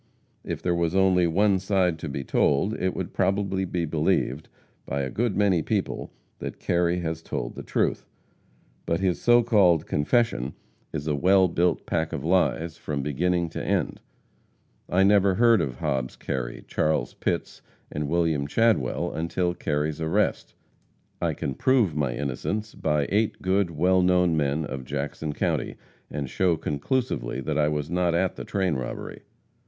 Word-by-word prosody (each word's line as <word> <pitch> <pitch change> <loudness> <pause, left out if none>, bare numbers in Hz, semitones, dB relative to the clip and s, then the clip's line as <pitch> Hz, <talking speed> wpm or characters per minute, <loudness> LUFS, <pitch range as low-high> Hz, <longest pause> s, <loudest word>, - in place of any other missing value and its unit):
If - - -5
there 90 - +1
was 85 0 0
only 95 -2 +4
one 95 +3 +3
side 95 -4 +1
to 80 - -5
be 70 0 -4
told, 70 - +2
it 95 0 0
would - - -4
probably 95 -1 0
be 90 -2 -2
believed 80 -2 0 0.3
by 70 +1 -2
a 65 - -4
good 115 -2 -1
many 100 -5 +3
people - - -2 0.3
that - - -6
Kerry 90 0 +1
has 80 -1 -3
told - - -4
the - - -7
truth. - - -1 0.8
But 85 - +1
his 95 -2 0
so 120 0 +5
called 95 -8 +4
confession 75 - +1 0.4
is 75 -2 -4
a 75 - 0
well 95 +5 +4
built 85 0 0
pack 80 -1 -1
of 70 - -4
lies 85 -2 +1
from 70 -3 -3
beginning 85 +4 0
to - - -5
end. - - -1 0.9
I 95 +2 +3
never 100 -1 +4
heard 115 -2 +5
of 65 -6 -3
Hobbs 65 0 -2
Kerry, - - -4
Charles 75 -6 0
Pitts - - -3 0.3
and 75 0 -3
William 80 -3 +1
Chadwell 110 - +1
until 85 +2 -1
Kerry's 75 -1 -2
arrest. 80 0 0 0.7
I - - 0
can 70 - -3
prove 120 - +2
my 70 -5 0
innocence 85 +10 -3
by 75 -2 0
eight 105 +2 +1
good, 95 0 +2
well 90 +4 +2
known 90 -2 +3
men 75 +1 0
of 70 -2 -6
Jackson 75 +3 -4
county, - - -1 0.3
and 70 -2 -4
show 85 +4 +1
conclusively 75 - -2
that 65 - -1
I 75 - +3
was 75 0 -2
not 90 -1 +1
at 90 +1 +1
the - - -6
train 95 -4 0
robbery. 65 -3 -5
85 Hz, 160 wpm, -26 LUFS, 75-95 Hz, 0.9 s, so